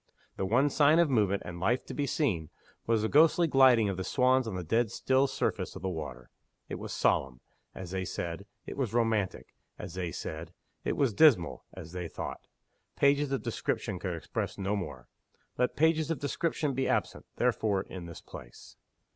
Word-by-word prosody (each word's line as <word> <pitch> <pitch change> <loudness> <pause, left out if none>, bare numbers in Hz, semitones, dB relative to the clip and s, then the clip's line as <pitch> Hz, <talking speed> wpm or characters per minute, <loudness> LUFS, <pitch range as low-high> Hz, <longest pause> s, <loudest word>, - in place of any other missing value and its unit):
The 95 - -2
one 130 +8 +3
sign 150 +3 +5
of 170 -4 +4
movement 100 -5 +2
and 85 0 -7
life 115 +8 +1
to - - -7
be 145 -1 -1
seen 95 - 0 0.4
was 115 -2 +2
the - - +2
ghostly 160 +6 +5
gliding 130 -7 +5
of 100 -2 -2
the 95 - -2
swans 130 +2 +2
on 105 - -4
the 90 - -3
dead 115 +7 +1
still 130 +5 +2
surface - - -2
of - - -9
the 95 - 0
water. 80 -6 -6 0.4
It - - -5
was - - -6
solemn 65 -2 +1 0.4
as 90 -2 -7
they 95 -1 -2
said; 85 +2 -5 0.2
it - - -7
was 125 -5 -2
romantic 110 -5 0 0.2
as - - -7
they 90 -2 -3
said. 80 +2 -6 0.3
It - - -1
was 135 -6 +2
dismal 110 - +4
as 80 - -9
they 90 -1 -4
thought. - - -7 0.5
Pages 140 0 +3
of 135 - -1
description 90 - -2
could 90 -2 -3
express 85 - -4
no 100 +1 -1
more. 75 -11 -6 0.5
Let 125 - +1
pages 160 0 +2
of 165 - 0
description 150 0 -1
be 135 +1 0
absent, - - -1
therefore, 110 -5 +1
in 90 -3 -8
this 85 - -9
place. - - -12
110 Hz, 190 wpm, -30 LUFS, 90-135 Hz, 0.5 s, sign